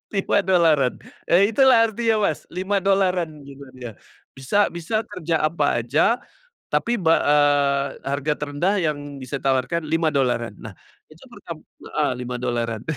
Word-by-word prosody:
$5-an, 170 Hz, -9 st, +2 dB, 0.3 s
eee, 200 Hz, +5 st, +4 dB
itulah 255 Hz, -3 st, +5 dB
artinya 225 Hz, 0 st, 0 dB
Mas 155 Hz, -, -3 dB
$5-an 190 Hz, -2 st, 0 dB, 0.2 s
gitu 140 Hz, 0 st, -12 dB
kan 130 Hz, -2 st, -13 dB
ya, 120 Hz, -2 st, -7 dB, 0.4 s
bisa 135 Hz, +9 st, -3 dB, 0.2 s
bisa 210 Hz, +6 st, -2 dB
kerja 170 Hz, -5 st, -3 dB
apa 150 Hz, -6 st, 0 dB
aja, 155 Hz, -, +2 dB, 0.5 s
tapi 235 Hz, -3 st, 0 dB
ba 165 Hz, -1 st, +4 dB
eee, 145 Hz, -1 st, +3 dB, 0.2 s
harga 140 Hz, +2 st, -1 dB
terendah 150 Hz, +7 st, -1 dB
yang 145 Hz, -5 st, -3 dB
bisa 135 Hz, +1 st, -6 dB
ditawarkan 135 Hz, +4 st, -1 dB
$5 135 Hz, -8 st, 0 dB
nah -, -, -10 dB, 0.3 s
itu -, -, -18 dB
pertama -, -, -10 dB, 0.3 s
heeh, -, -, 0 dB
$5-an. 120 Hz, -2 st, -3 dB
150 Hz, 130 wpm, -22 LUFS, 135-190 Hz, 0.5 s, itulah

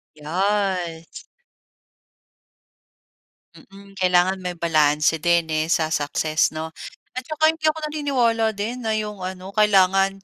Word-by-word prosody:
Yes 180 Hz, 0 st, -2 dB, 2.3 s
Mm, 195 Hz, 0 st, -15 dB
kailangan 185 Hz, +1 st, +2 dB
may 180 Hz, -1 st, -5 dB
balanse 155 Hz, -1 st, +2 dB
din, 170 Hz, -1 st, +1 dB
eh, 155 Hz, 0 st, 0 dB
sa 160 Hz, -2 st, +1 dB
success 155 Hz, +1 st, 0 dB
'no? 160 Hz, +1 st, -5 dB, 0.4 s
At 255 Hz, 0 st, -7 dB
saka 315 Hz, 0 st, +2 dB
hindi 320 Hz, -1 st, -2 dB
ako 310 Hz, +1 st, +1 dB
naniniwala 240 Hz, -7 st, 0 dB
din 220 Hz, +5 st, -4 dB
na 220 Hz, -, +1 dB
'yong 210 Hz, -2 st, -4 dB
ano 185 Hz, +1 st, -7 dB
kailangan 195 Hz, -2 st, +3 dB
190 Hz, 115 wpm, -22 LUFS, 165-215 Hz, 2.3 s, kailangan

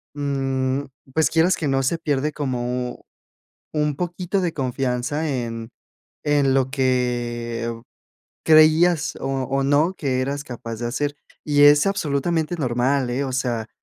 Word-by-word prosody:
mm, 135 Hz, -2 st, -1 dB, 0.3 s
pues, 160 Hz, -, +3 dB
quieras 170 Hz, +3 st, +3 dB
que 155 Hz, -, -2 dB
no 135 Hz, -1 st, +1 dB
se 150 Hz, +6 st, +1 dB
pierde 150 Hz, -2 st, 0 dB
como 125 Hz, -3 st, -3 dB, 0.7 s
un 150 Hz, -1 st, 0 dB
poquito 180 Hz, +3 st, -2 dB
de 175 Hz, -3 st, -1 dB
confianza 130 Hz, +3 st, -1 dB
en 115 Hz, -4 st, -4 dB, 0.5 s
en 145 Hz, -2 st, +2 dB
lo 130 Hz, -1 st, +2 dB
que 120 Hz, -3 st, -1 dB, 0.7 s
creías, 155 Hz, +1 st, +5 dB
o -, -, -3 dB
o 135 Hz, 0 st, -1 dB
no, 145 Hz, +6 st, +2 dB
que 135 Hz, -7 st, -1 dB
eras 140 Hz, +1 st, -3 dB
capaz 115 Hz, -3 st, -7 dB
de 120 Hz, +2 st, -4 dB
hacer. 145 Hz, +4 st, -2 dB, 0.3 s
Y 145 Hz, -1 st, +3 dB
es 145 Hz, +2 st, +7 dB
absolutamente 165 Hz, -2 st, 0 dB
normal, 130 Hz, -1 st, 0 dB
eh, 130 Hz, +3 st, -1 dB
o 130 Hz, -, -3 dB
sea, 120 Hz, -4 st, -2 dB
135 Hz, 140 wpm, -22 LUFS, 125-150 Hz, 0.7 s, es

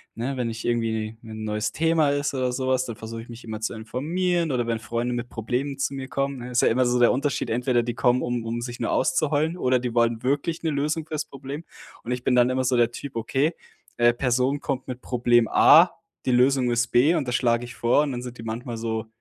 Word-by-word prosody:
ne, 130 Hz, +3 st, -3 dB
wenn 120 Hz, -2 st, -1 dB
ich 115 Hz, 0 st, -6 dB
irgendwie 110 Hz, -2 st, -1 dB
'ne 110 Hz, -, -11 dB
'n 110 Hz, 0 st, -6 dB
neues 105 Hz, 0 st, -1 dB
Thema 160 Hz, -2 st, +2 dB
ist 145 Hz, 0 st, -1 dB
oder 130 Hz, -2 st, 0 dB
sowas, 130 Hz, 0 st, 0 dB
dann 115 Hz, -, -6 dB
versuche 115 Hz, 0 st, -7 dB
ich -, -, -16 dB
mich 120 Hz, +1 st, -10 dB
immer 110 Hz, -2 st, -6 dB
zu 110 Hz, -, -2 dB
informieren 165 Hz, +9 st, -1 dB
oder 120 Hz, -2 st, 0 dB
wenn 115 Hz, -1 st, -1 dB
Freunde 120 Hz, +2 st, -2 dB
mit 120 Hz, 0 st, -3 dB
Problemen 125 Hz, +5 st, -3 dB
zu 135 Hz, -, -1 dB
mir 135 Hz, -1 st, -5 dB
kommen, 140 Hz, 0 st, -2 dB
ne, 125 Hz, +1 st, -7 dB
ist 120 Hz, -, +3 dB
ja -, -, +4 dB
immer 125 Hz, +3 st, +2 dB
so 120 Hz, 0 st, +2 dB
der 120 Hz, -, +6 dB
Unterschied, 140 Hz, 0 st, -1 dB
entweder 120 Hz, +1 st, +1 dB
die 120 Hz, 0 st, -4 dB
kommen, 125 Hz, 0 st, +2 dB
um 120 Hz, -1 st, -2 dB
um 115 Hz, +1 st, -3 dB
sich 120 Hz, 0 st, -6 dB
nur 115 Hz, -, -1 dB
auszuheulen, 155 Hz, +4 st, +1 dB
oder 130 Hz, -6 st, +2 dB
die 120 Hz, -1 st, -3 dB
wollen 115 Hz, -1 st, +2 dB
wirklich 145 Hz, +6 st, -1 dB
'ne 165 Hz, -, +1 dB
Lösung 150 Hz, +2 st, -1 dB
fürs 155 Hz, -1 st, -3 dB
Problem. 140 Hz, +3 st, -8 dB, 0.4 s
Und 120 Hz, -, -5 dB
ich 125 Hz, 0 st, -2 dB
bin 125 Hz, -, +2 dB
dann 125 Hz, 0 st, +5 dB
immer 130 Hz, 0 st, 0 dB
so 125 Hz, 0 st, +2 dB
der 120 Hz, -1 st, +3 dB
Typ, 140 Hz, +1 st, -8 dB
okay, 135 Hz, +8 st, 0 dB, 0.4 s
äh, 120 Hz, 0 st, +4 dB
Person 130 Hz, +3 st, 0 dB
kommt 135 Hz, -3 st, -3 dB
mit 130 Hz, -1 st, -6 dB
Problem 120 Hz, -2 st, +2 dB
A, -, -, +7 dB, 0.3 s
die 130 Hz, -, +1 dB
Lösung 125 Hz, 0 st, +3 dB
ist 120 Hz, 0 st, +1 dB
B 145 Hz, +8 st, +4 dB
und 150 Hz, -5 st, -1 dB
das 125 Hz, -, 0 dB
schlage 120 Hz, -1 st, +1 dB
ich 120 Hz, -, -10 dB
vor, 120 Hz, +5 st, +3 dB
und 145 Hz, -, -2 dB
dann 120 Hz, -, -4 dB
sind 125 Hz, -1 st, -8 dB
die -, -, -7 dB
manchmal 115 Hz, +1 st, -5 dB
so: 110 Hz, 0 st, -3 dB
125 Hz, 245 wpm, -24 LUFS, 120-140 Hz, 0.4 s, A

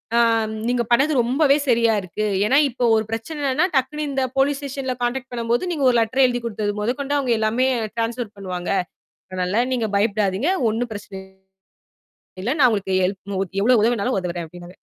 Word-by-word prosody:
ஆம், 225 Hz, -2 st, +3 dB, 0.2 s
நீங்க 245 Hz, -1 st, +1 dB
பண்ணது 275 Hz, +6 st, +4 dB
ரொம்பவே 275 Hz, +4 st, +3 dB
சரியாக 230 Hz, -3 st, +3 dB
இருக்கு. 200 Hz, +4 st, -4 dB, 0.2 s
ஏன்னா 265 Hz, +6 st, +3 dB
இப்போ 245 Hz, 0 st, -4 dB
ஒரு 220 Hz, -, +2 dB
பிரச்சனைன்னா, 280 Hz, +6 st, -1 dB
டக்குனு 295 Hz, +3 st, 0 dB
இந்த 270 Hz, -1 st, 0 dB
போலீஸ் 275 Hz, +1 st, +2 dB
ஸ்டேஷன்ல 270 Hz, -2 st, -4 dB
கான்டாக்ட் 260 Hz, +1 st, -2 dB
பண்ணும்போது, 235 Hz, +9 st, -1 dB
நீங்க 285 Hz, -4 st, -1 dB
ஒரு 240 Hz, -, +2 dB
லெட்டர் 255 Hz, +4 st, +3 dB
எழுதி 245 Hz, -1 st, -2 dB
கொடுத்தது 210 Hz, -2 st, -2 dB
முதற்கொண்டு 275 Hz, +6 st, -1 dB
அவுங்க 255 Hz, -4 st, +1 dB
எல்லாமே 230 Hz, +4 st, +1 dB, 0.3 s
டிரான்ஸ்பர் 230 Hz, -1 st, -3 dB
பண்ணுவாங்க. 180 Hz, -2 st, -5 dB, 0.6 s
அதனால 185 Hz, +5 st, 0 dB
நீங்க 230 Hz, -4 st, 0 dB
பயப்படாதீங்க. 205 Hz, -, +1 dB, 0.2 s
ஒன்னும் 230 Hz, +1 st, -3 dB
பிரச்சனை 205 Hz, -2 st, -8 dB, 1.2 s
இல்ல. 240 Hz, +8 st, 0 dB
நான் 255 Hz, -, +7 dB
உங்களுக்கு 190 Hz, -3 st, -1 dB
ஹெல்ப் 195 Hz, 0 st, -3 dB
எவ்ளோ 240 Hz, +1 st, +4 dB
உதவினாலும் 235 Hz, 0 st, +1 dB
உதவுறேன் 175 Hz, -2 st, -4 dB
அப்பிடின்னாரு 175 Hz, +2 st, -12 dB
235 Hz, 160 wpm, -21 LUFS, 205-260 Hz, 1.2 s, நான்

